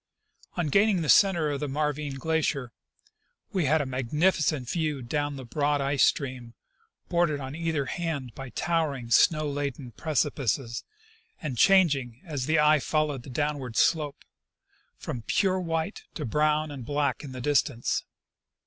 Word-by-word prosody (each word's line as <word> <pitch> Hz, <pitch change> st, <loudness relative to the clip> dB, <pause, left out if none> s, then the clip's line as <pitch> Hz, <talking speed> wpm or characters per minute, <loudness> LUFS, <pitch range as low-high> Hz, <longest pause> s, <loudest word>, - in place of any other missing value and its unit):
On 175 Hz, -, +1 dB
gaining 200 Hz, +1 st, +3 dB
the 150 Hz, -, -3 dB
center 170 Hz, -5 st, +5 dB
of 140 Hz, -, -2 dB
the 150 Hz, -, -2 dB
Marvine 150 Hz, 0 st, -2 dB
glacier 145 Hz, -4 st, -1 dB, 0.8 s
we 185 Hz, -5 st, +1 dB
had 155 Hz, +3 st, +3 dB
a -, -, -2 dB
mag 130 Hz, -2 st, -4 dB
nificent 155 Hz, -4 st, +2 dB
view 150 Hz, -3 st, -1 dB
down 145 Hz, +3 st, -2 dB
the 135 Hz, -2 st, -8 dB
broad 145 Hz, +4 st, 0 dB
ice 140 Hz, 0 st, +2 dB
stream, 125 Hz, -4 st, 0 dB, 0.5 s
bordered 170 Hz, -4 st, +1 dB
on 135 Hz, 0 st, -6 dB
either 160 Hz, -4 st, -1 dB
hand 145 Hz, -7 st, -3 dB
by 135 Hz, -1 st, -8 dB
towering, 145 Hz, -7 st, -1 dB
snow 155 Hz, +4 st, +4 dB
laden 140 Hz, -3 st, -4 dB
precipices, 135 Hz, -3 st, -1 dB, 0.6 s
and 150 Hz, -6 st, -4 dB
changing, 140 Hz, -, +3 dB
as 145 Hz, -6 st, -3 dB
the 160 Hz, +1 st, +3 dB
eye 150 Hz, 0 st, +5 dB
fol 155 Hz, +2 st, 0 dB
lowed 135 Hz, -4 st, -4 dB
the 130 Hz, -, -12 dB
downward 140 Hz, -3 st, -2 dB
slope, 150 Hz, -4 st, +1 dB, 0.7 s
from 120 Hz, -, -5 dB
pure 190 Hz, -, +1 dB
white 165 Hz, +2 st, -3 dB
to 150 Hz, -, -3 dB
brown 150 Hz, +4 st, +1 dB
and 135 Hz, -3 st, -7 dB
black 145 Hz, +4 st, -1 dB
in 140 Hz, -, -7 dB
the 130 Hz, -, -7 dB
distance. 140 Hz, -2 st, +1 dB
145 Hz, 155 wpm, -27 LUFS, 130-160 Hz, 0.8 s, center